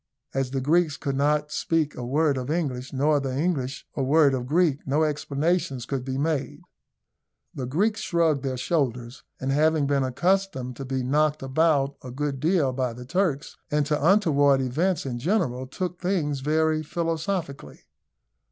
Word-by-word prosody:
As 135 -1 -1
the 135 0 -2
Greeks 160 +2 +2
could 140 -1 -3
not 150 +2 +1
speak 160 -3 0
a 125 - -7
word 145 +4 +1
of 130 +1 -4
English, 140 -6 -2
nor 145 +2 +2
the 135 -2 -3
English 140 -5 -1
a 140 - -1
word 140 +1 +4
of 125 -1 -2
Greek, 155 -1 +2
no 145 +4 +2
explanations 150 -2 -1
could 135 -1 -3
be 130 0 -3
made. 145 - -2 0.9
The 130 -2 -4
Greeks 210 - 0
shrugged 170 -8 +1
their 130 -1 -3
shoulders, 125 -4 -2 0.2
and 130 +1 -2
having 155 +1 +3
been 140 0 +1
accustomed 135 -2 0
to 135 - -6
be 130 0 -2
knocked 150 +3 +1
about 140 0 +1
a 130 - -7
good 140 +1 -3
deal 155 -3 +2
by 125 -2 -1
the 125 +1 -9
Turks, 165 -1 -1
and 150 -1 +1
to 150 +1 +1
untoward 145 -9 +4
events 150 +7 0
in 120 -3 -3
general, 130 - 0
took 180 +5 -5
things 165 -7 0
very 155 +2 +1
philosophically. 165 - -3
145 Hz, 165 wpm, -25 LUFS, 130-160 Hz, 0.9 s, word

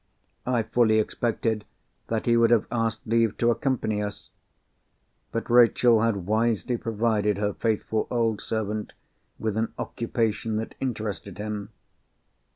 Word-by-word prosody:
I 120 -3 +2
fully 110 0 +3
expected 110 0 0 0.4
that 115 -1 -2
he 120 - +4
would 115 -1 +5
have 120 -3 +4
asked 115 -1 -1
leave 115 -1 +2
to 120 0 +3
accompany 115 -4 0
us. 105 0 -6 1.0
But 115 - -3
Rachel 120 -1 +5
had 105 -6 0
wisely 110 +3 +1
provided 110 -3 0
her 105 0 0
faithful 110 0 -1
old 115 -3 0
servant 110 -1 -3 0.4
with 110 -2 -2
an 110 +1 0
occupation 115 -1 -2
that 110 +1 -3
interested 110 -7 -4
him. 105 -1 -4
110 Hz, 130 wpm, -26 LUFS, 105-115 Hz, 1.0 s, would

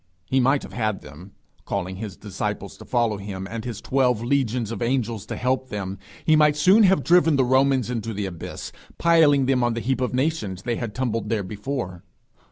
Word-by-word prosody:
He 130 +8 +1
might 135 +3 +3
have - - -10
had 110 -4 -1
them. 80 +7 -13 0.3
Calling 95 +1 -3
his 105 -2 -6
disciples - - -4
to - - -12
follow 115 -3 +1
him, 95 -1 -6
and 115 -1 -4
his 115 -3 -5
twelve 125 -4 +1
legions 120 -3 0
of 115 - -5
angels 115 -4 -1
to - - -4
help 130 +1 -1
them, 95 -2 -5 0.3
he 155 - +5
might 150 -1 +5
soon 185 +9 +6
have 190 -8 +4
driven 170 -3 +4
the 135 -2 +3
Romans 130 -1 +2
into 115 -2 -3
the 105 -1 -3
abyss, 90 -3 -7 0.3
piling 155 -5 +4
them 130 -1 +2
on 120 -1 +1
the - - -1
heap 130 +2 -1
of 125 0 -1
nations 130 - -1
they 120 -1 -1
had 115 -4 -5
tumbled 120 -3 -2
there 110 -3 0
before. 105 -2 -5
120 Hz, 200 wpm, -24 LUFS, 105-135 Hz, 0.3 s, soon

